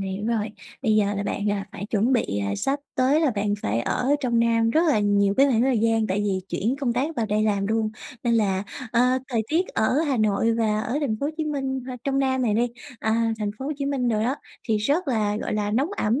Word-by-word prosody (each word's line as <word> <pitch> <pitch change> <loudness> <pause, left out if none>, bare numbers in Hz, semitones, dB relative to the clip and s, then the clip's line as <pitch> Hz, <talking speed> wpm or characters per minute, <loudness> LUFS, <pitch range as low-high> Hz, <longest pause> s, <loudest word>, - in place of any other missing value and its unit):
hiểu 195 +2 -3
rồi, 225 -2 0 0.3
bây 220 -4 +3
giờ 205 -1 +2
là 200 - -2
bạn, 205 +1 -2
ờ, 205 - +1 0.2
phải 200 - -6
chuẩn 225 +5 +2
bị 100 - 0 0.2
sắp 275 +1 -1
tới 265 +5 +3
là 305 - +3
bạn 205 -2 0
phải 110 +3 0
ở 250 - -1
trong 240 -3 +1
Nam 230 -1 +3
rất 315 - +3
là 275 -8 +3
nhiều 200 -1 +2
cái 275 - +6
khoảng 240 -4 +2
thời 260 -3 +2
gian, 225 0 +2
tại 190 +2 0
vì 195 -2 0
chuyển 235 +7 -1
công 245 -4 +1
tác 285 +6 -1
vào 225 -2 0
đây 210 +1 +1
làm 200 -2 +1
luôn, 220 0 0 0.3
nên 235 -1 +2
là 195 -3 +1 0.3
ờ, 235 - +3 0.3
thời 230 -4 0
tiết 340 +4 +1
ở 225 +6 +1
Hà 275 - +1
Nội 215 +1 +2
và 215 -2 +1
ở 250 +6 -2
thành 250 -8 0
phố 280 - 0
Hồ 300 - -1
Chí 315 - -1
Minh 270 -3 -2
h 260 - -5
trong 275 -1 0
Nam 260 -1 +1
này 220 -4 +1
đi, 235 +3 +2 0.3
à, 225 +1 +1
thành 210 -1 -1
phố 265 - -5
Hồ 295 - -1
Chí 280 - -2
Minh 265 -4 0
đồ 215 -2 +1
đó, 250 +5 +1 0.3
thì 220 - +3
rất 285 - 0
là, 210 -4 +1
gọi 215 - -3
là, 205 -1 -1
nóng 270 - +1
ẩm, 225 +6 +1
225 Hz, 255 wpm, -24 LUFS, 210-265 Hz, 0.3 s, cái